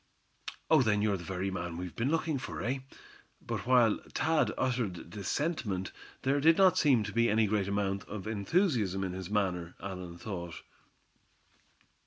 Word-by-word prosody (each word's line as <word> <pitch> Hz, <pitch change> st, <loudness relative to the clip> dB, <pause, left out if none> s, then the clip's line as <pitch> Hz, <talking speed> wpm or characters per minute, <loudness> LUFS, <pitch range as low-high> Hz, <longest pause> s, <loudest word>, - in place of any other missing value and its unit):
"Oh! -, -, +7 dB
then 105 Hz, -4 st, +2 dB
you're 105 Hz, -2 st, +2 dB
the 85 Hz, -, -9 dB
very 95 Hz, +2 st, -3 dB
man 85 Hz, -2 st, -4 dB
we've 90 Hz, 0 st, -6 dB
been 120 Hz, +4 st, 0 dB
looking 160 Hz, -2 st, 0 dB
for, -, -, -6 dB
eh?" 130 Hz, +3 st, -1 dB, 0.6 s
but -, -, -5 dB
while 120 Hz, -4 st, +5 dB, 0.2 s
Thad 160 Hz, +2 st, +2 dB
uttered 115 Hz, -10 st, -2 dB
this 100 Hz, 0 st, -6 dB
sentiment, 110 Hz, -, -1 dB, 0.3 s
there 135 Hz, +2 st, +2 dB
did 165 Hz, +2 st, +6 dB
not 190 Hz, -2 st, +6 dB
seem 130 Hz, -7 st, +4 dB
to 105 Hz, -1 st, -5 dB
be 115 Hz, 0 st, +3 dB
any 110 Hz, +1 st, +3 dB
great 100 Hz, -1 st, 0 dB
amount 100 Hz, -1 st, -1 dB
of 105 Hz, -1 st, -7 dB
enthusiasm 110 Hz, -, +1 dB
in 95 Hz, -1 st, -3 dB
his 95 Hz, 0 st, -6 dB
manner, 90 Hz, -5 st, -1 dB
Allan 90 Hz, -3 st, -6 dB
thought. 85 Hz, -4 st, -6 dB
105 Hz, 165 wpm, -31 LUFS, 95-130 Hz, 0.6 s, Oh